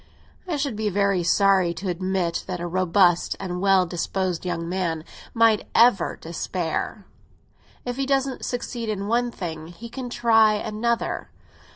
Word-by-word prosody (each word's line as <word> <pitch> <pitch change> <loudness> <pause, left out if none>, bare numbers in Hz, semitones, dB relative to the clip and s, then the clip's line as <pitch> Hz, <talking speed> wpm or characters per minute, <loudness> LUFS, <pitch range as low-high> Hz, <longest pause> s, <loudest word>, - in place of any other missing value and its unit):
"I 335 -4 -1
should 280 -5 -2
be 215 0 -1
very 200 -1 +1
sorry 185 0 +3
to 185 +4 -5
admit 180 -1 -1
that 180 -2 -4
a 175 - -4
robust 180 0 +2
and 180 -2 -4
well 195 -2 +4
disposed 180 0 -2
young 165 -1 -2
man 170 -3 -2 0.3
need 225 -2 +4
ever 230 -7 +4
despair. 170 +4 -3 0.8
If 245 0 -3
he 275 -1 -1
doesn't 270 -1 0
succeed 240 -2 -4
in 200 -2 -2
one 240 +2 +1
thing, 160 -7 -6
he 195 +8 -10
can 250 +1 -6
try 225 -3 +4
another. 220 +3 -2
195 Hz, 150 wpm, -24 LUFS, 175-230 Hz, 0.8 s, well